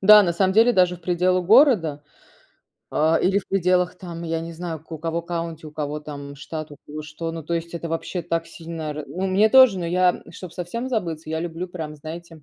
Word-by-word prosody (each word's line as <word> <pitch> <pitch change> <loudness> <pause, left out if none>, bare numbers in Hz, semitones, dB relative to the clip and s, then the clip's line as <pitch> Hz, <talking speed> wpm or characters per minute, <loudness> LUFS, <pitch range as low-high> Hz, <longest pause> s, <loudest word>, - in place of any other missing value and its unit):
Да, 210 +2 +9
на 175 -3 +1
самом 190 +2 +2
деле 230 +4 +5
даже 180 -3 +3
в - - -21
пределах 180 0 +1
города, 205 - +5 0.9
а, 160 +2 +3
или 195 +2 +3
в 195 - -8
пределах 180 -1 +2
там, 170 -3 -8
я 165 0 -1
не 165 +1 -6
знаю, 165 -2 -5
к 160 - -30
у 160 - -5
кого 165 +1 -3
county, 165 -2 -4
у - - -9
кого 150 0 -4
там 140 -1 -8
штат, 150 +2 -7
у 145 - -10
кого 150 +1 -6
что. 160 +2 -5
Ну, 165 -1 -6
то 170 - -2
есть 170 0 -4
это 170 0 -4
вообще 165 +2 -3
так 165 0 -2
сильно 165 -2 -6
ра 150 0 -6
ну, 190 +2 -3
мне 200 +4 +4
тоже, 255 -6 +7
но 170 - -3
я, 180 +1 +4
м, - - -14
чтоб 180 -3 -9
совсем 230 +9 -4
забыться, 165 -9 -3
я 160 - -1
люблю 170 +2 -4
прям, 160 -4 -6
знаете, 160 +1 -9
170 Hz, 230 wpm, -23 LUFS, 160-185 Hz, 0.9 s, Да